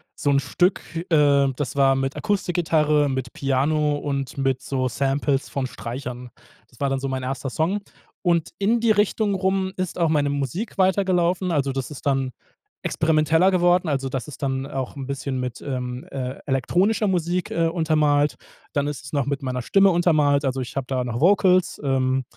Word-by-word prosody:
so 145 - -1
'n 140 -1 +4
Stück, 180 +6 +1 0.3
äh, 140 -3 +4
das 145 -1 -4
war 135 -1 +4
mit 135 +1 -2
Akustikgitarre, 160 -7 +1
mit 130 -2 -3
Piano 145 +2 +1
und 140 -2 -3
mit 135 -1 0
so 130 -2 -1
Samples 135 +2 0
von 135 -2 -2
Streichern. 125 0 -6 0.4
Das 120 - -22
war 140 -1 0
dann 135 - 0
so 135 - -3
mein 130 -1 -3
1. 135 0 -3
Song. 165 +10 0 0.4
Und 170 -3 +1
in 220 +4 +2
die 230 -1 +3
Richtung 210 0 +2
rum 190 0 0
ist 185 -1 -3
auch 170 -2 +2
meine 145 -2 +2
Musik 145 - -3
weitergelaufen, 185 -1 +2
also 140 -4 +1
das 135 -1 -4
ist 150 - -10
dann 135 -2 +1 0.5
experimenteller 160 +3 +3
geworden, 180 -1 +3
also 135 -2 -1
das 130 0 -4
ist 150 0 -9
dann 135 0 -1
auch 135 -2 -4
'n 135 -2 -6
bisschen 135 -1 -3
mit, 125 -1 -4
ähm, 125 -2 -4
äh, 130 -1 -4
elektronischer 180 - +1
Musik, 180 -1 0
äh, 165 - +1
untermalt. 150 -4 +2 0.4
Dann 145 -1 0
ist 145 -4 -4
es 135 - -10
noch 140 -3 +1
mit 140 0 -2
meiner 125 -2 -3
Stimme 195 +8 +4
untermalt, 155 -5 +3
also 135 0 -1
ich 125 - -7
habe 135 -2 -2
da 130 -2 -1
noch 120 -1 -3
Vocals, 185 +1 +3
ähm, 130 -1 +1
145 Hz, 180 wpm, -23 LUFS, 135-175 Hz, 0.5 s, n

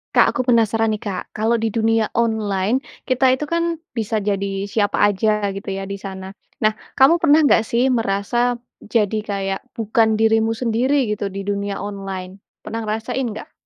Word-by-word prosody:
Kak, - - +7
aku - - 0
penasaran 225 -1 +3
nih, 215 -1 -2
Kak, 190 -3 -3
kalau 220 +2 +1
di 225 - +1
dunia 225 0 +1
online 220 0 +1 0.2
kita 260 0 +3
itu 260 +3 +1
kan 335 +1 -1 0.2
bisa 225 -2 -1
jadi 200 -1 -2
siapa 205 0 0
aja 205 0 +1
gitu 195 0 -7
ya 195 0 -3
di 200 0 -6
sana, 190 -1 -7 0.2
nah 215 0 +2 0.2
kamu 330 +6 +5
pernah 310 -1 +5
enggak 260 - +5
sih 240 +4 +1
merasa 235 +2 0 0.2
jadi 215 -1 0
kayak 195 -1 -2 0.2
bukan 220 0 +2
dirimu 225 0 +2
sendiri 245 +1 +1
gitu 200 -1 -3
di 195 0 -6
dunia 200 0 -2
online? 195 -2 -6 0.2
Pernah 225 +1 -4
ngerasain 220 +4 -2
enggak? 230 -5 -5
220 Hz, 165 wpm, -20 LUFS, 200-235 Hz, 0.2 s, Kak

